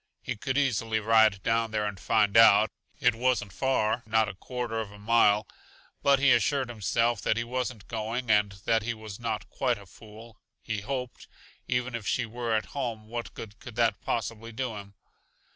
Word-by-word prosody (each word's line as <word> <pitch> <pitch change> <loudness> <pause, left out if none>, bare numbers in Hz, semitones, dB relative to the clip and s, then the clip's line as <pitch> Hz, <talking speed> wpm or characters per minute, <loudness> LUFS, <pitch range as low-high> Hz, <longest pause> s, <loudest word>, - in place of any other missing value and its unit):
He - - -3
could 135 +6 -2
easily 115 -5 +1
ride 110 -2 +4
down 115 0 +1
there 105 -1 -1
and 100 -2 -4
find 105 +1 +2
out. 110 -1 +7 0.3
It 125 -1 +4
wasn't 120 -4 0
far; 120 -4 +1
not 110 0 +3
a - - -5
quarter 120 +2 -4
of 110 -3 -5
a 105 - -12
mile, 105 -1 +3 0.5
but 140 0 +5
he 135 0 +4
assured 130 +2 +2
himself 115 0 0
that 110 - +1
he 115 - 0
wasn't 125 -3 -4
going, 115 +2 -2
and 105 -1 +3
that 115 0 +3
he 120 +2 -3
was 110 -2 -9
not 115 -3 -3
quite 125 -3 0
a 100 - -13
fool, 110 +3 -14 0.2
he 105 -2 -3
hoped 125 +1 -5 0.4
Even 125 0 -1
if 115 -3 -5
she 120 - +1
were 115 0 -2
at 110 - 0
home, 115 -6 -4
what 120 0 -5
good 105 -2 -9
could 120 - -10
that 115 -1 +1
possibly 115 0 -3
do 115 0 -3
him? 100 -1 -10
115 Hz, 190 wpm, -28 LUFS, 105-120 Hz, 0.5 s, out